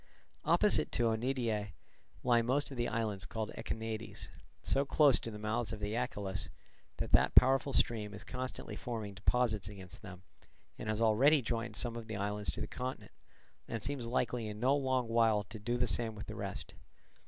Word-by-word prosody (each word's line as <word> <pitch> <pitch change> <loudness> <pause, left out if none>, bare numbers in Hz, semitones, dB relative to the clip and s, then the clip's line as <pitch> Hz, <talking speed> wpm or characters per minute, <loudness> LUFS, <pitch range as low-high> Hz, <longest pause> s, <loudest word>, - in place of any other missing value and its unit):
Opposite - - +4
to 120 - +2
Oeniadae 115 -3 0 0.5
lie 120 -1 +4
most 135 +5 0
of 135 - -7
the 120 0 0
islands 105 -5 -2
called 110 -1 -3
Echinades, 110 0 -4 0.3
so 135 - +2
close 140 -1 +5
to - - -6
the 105 - -7
mouths 110 +1 -1
of 110 - -5
the 105 +1 -2
Achelous 100 -4 -2 0.5
that - - -3
that - - +4
powerful 135 +2 +6
stream 105 -5 +1
is 105 - -9
constantly 130 +1 -5
forming 110 -5 -5
deposits 105 0 +1
against 95 -3 -10
them, 95 -3 -10 0.6
and 110 - -4
has 110 +1 0
already 130 +6 +5
joined 115 -1 -2
some 120 0 -2
of 115 -1 -6
the 110 - -4
islands 105 +1 -2
to - - -6
the - - -2
continent, 130 +1 -5 0.6
and 115 -2 -4
seems 135 -4 -2
likely 120 -1 0
in 105 0 -6
no 130 +4 +4
long 130 -3 +1
while 115 -2 +3
to 105 +2 -9
do 120 +4 -1
the 125 - +2
same 115 -2 +1
with 105 - -7
the - - -7
rest. - - -5
115 Hz, 185 wpm, -34 LUFS, 105-125 Hz, 0.6 s, powerful